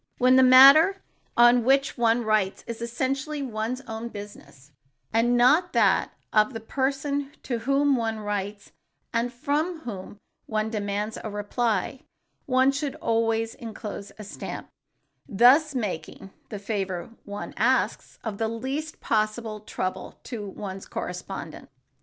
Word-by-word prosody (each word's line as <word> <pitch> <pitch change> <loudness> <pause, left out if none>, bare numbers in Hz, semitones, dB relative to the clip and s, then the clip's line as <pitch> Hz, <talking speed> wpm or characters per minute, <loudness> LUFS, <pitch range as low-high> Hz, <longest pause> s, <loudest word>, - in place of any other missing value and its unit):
When 255 +1 +5
the 260 - +7
matter 275 +9 +8 0.3
on 240 0 +6
which 270 +2 +2
one 235 0 +2
writes 215 -3 0
is 230 0 -6
essentially 270 +5 -2
one's 235 +1 -3
own 225 -2 -6
business, 150 - -11 0.4
and 240 +2 +3
not 300 +9 +4
that - - +3 0.2
of 215 +3 +3
the 225 - -4
person 275 +4 -2
to 240 -3 -2
whom 275 +3 +2
one 225 -2 -1
writes 205 -1 -4 0.4
and 235 +1 0
from 300 +7 -2
whom 205 -5 -7 0.3
one 215 0 -1
demands 210 0 -3
a 220 - -4
reply, 210 +2 -1 0.5
one 260 0 +4
should 280 0 -3
always 225 0 0
enclose 215 -3 -7
a 215 - -8
stamp, 205 - -7 0.6
thus 265 +8 +5
making 195 -4 -4 0.2
the 210 - -5
favor 195 -3 -3
one 205 0 -7
asks - - 0
of 215 -3 -5
the 225 - +1
least 265 +7 -4
possible 215 0 -1
trouble 185 -3 -5
to 220 -5 -6
one's 195 -1 -7
correspondent. 180 -2 -6
230 Hz, 135 wpm, -26 LUFS, 210-265 Hz, 0.6 s, matter